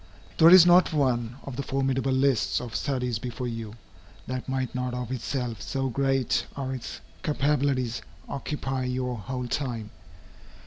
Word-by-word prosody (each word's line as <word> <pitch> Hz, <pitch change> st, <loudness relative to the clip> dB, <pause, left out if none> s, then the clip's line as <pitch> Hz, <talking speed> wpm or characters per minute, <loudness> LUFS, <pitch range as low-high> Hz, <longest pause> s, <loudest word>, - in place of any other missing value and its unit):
There 165 Hz, -, +9 dB
is 180 Hz, -1 st, +10 dB
not 175 Hz, -1 st, +6 dB
one, 120 Hz, -5 st, +1 dB
of 135 Hz, -3 st, -7 dB
the -, -, -1 dB
formidable 135 Hz, 0 st, 0 dB
lists 130 Hz, -3 st, +2 dB
of 120 Hz, -3 st, -7 dB
studies 125 Hz, -5 st, -1 dB
before 125 Hz, +1 st, -4 dB
you, 115 Hz, -2 st, -5 dB, 0.5 s
that 130 Hz, 0 st, -4 dB
might 130 Hz, -1 st, -1 dB
not 125 Hz, -1 st, -2 dB
of 125 Hz, -1 st, -4 dB
itself, 125 Hz, -2 st, -3 dB
so 135 Hz, -1 st, -2 dB
great 135 Hz, 0 st, +1 dB
are 135 Hz, -1 st, -3 dB
its 125 Hz, -6 st, -6 dB, 0.2 s
capabilities, 140 Hz, -4 st, +1 dB, 0.3 s
occupy 135 Hz, -2 st, -3 dB
your 125 Hz, 0 st, -1 dB
whole 125 Hz, +4 st, -4 dB
time. 120 Hz, -5 st, -3 dB
130 Hz, 145 wpm, -27 LUFS, 125-135 Hz, 0.5 s, is